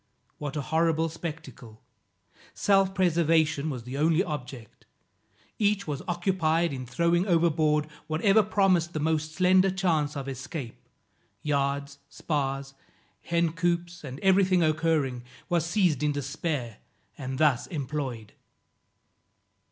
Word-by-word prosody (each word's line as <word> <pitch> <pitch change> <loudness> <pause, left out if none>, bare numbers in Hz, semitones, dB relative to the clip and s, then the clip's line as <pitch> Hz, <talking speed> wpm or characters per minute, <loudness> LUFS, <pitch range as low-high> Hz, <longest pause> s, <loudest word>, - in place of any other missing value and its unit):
What 145 -1 -5
a - - -1
horrible 160 +2 +1
spectacle! 135 -9 -8 0.8
Self 195 -1 +2
preservation 160 -4 +2
was 125 -5 -5
the 130 +3 -6
only 165 +3 +3
object; 130 - -8 0.7
each 205 -1 +1
was 145 -3 -4
occupied 175 -3 +1
in 130 -2 -6
throwing 170 - +1
overboard 160 -3 +2 0.2
whatever 195 +7 +4
promised 190 -5 +2
the 155 - -2
most 155 0 -1
slender 185 +1 +4
chance 165 -6 0
of 135 -1 -5
escape, 130 -1 -7 0.6
yards, 140 -1 -1
spars, 135 -3 -3 0.5
hen 170 -1 0
coops 175 0 -1
and 135 -1 -7
everything 190 -2 +4
occurring, 155 -5 +1 0.3
was 170 -2 +1
seized 170 -6 +2
in 150 -1 +1
despair, 140 -4 -3 0.4
and 130 -1 -5
thus 145 -5 +2
employed. 135 - -4
155 Hz, 115 wpm, -27 LUFS, 140-175 Hz, 0.8 s, whatever